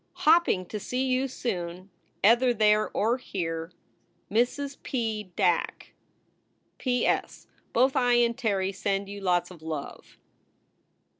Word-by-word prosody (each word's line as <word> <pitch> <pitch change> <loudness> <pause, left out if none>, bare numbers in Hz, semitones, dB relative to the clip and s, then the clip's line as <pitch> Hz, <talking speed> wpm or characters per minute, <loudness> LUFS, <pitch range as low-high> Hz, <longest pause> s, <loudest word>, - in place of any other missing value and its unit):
Hopping 310 - +4
to 210 +4 -6
see 250 +5 -2
you 260 +1 +1
soon 185 -7 -5 0.3
ether 240 +3 +5
there 215 0 +3
or 235 +5 0
here, 165 -7 -4 0.6
MRS. 275 +5 0
P. 220 -6 -3
DACK. 180 -4 0 0.9
P. 250 -2 0
S. - - -1 0.3
Both 260 +3 +3
I 245 -2 +3
and 235 -1 +3
Terry 200 -6 0
send 195 0 -2
you 200 0 -7
lots 180 -1 +1
of 170 -3 -13
love. 160 -3 -7
215 Hz, 125 wpm, -27 LUFS, 185-250 Hz, 0.9 s, ether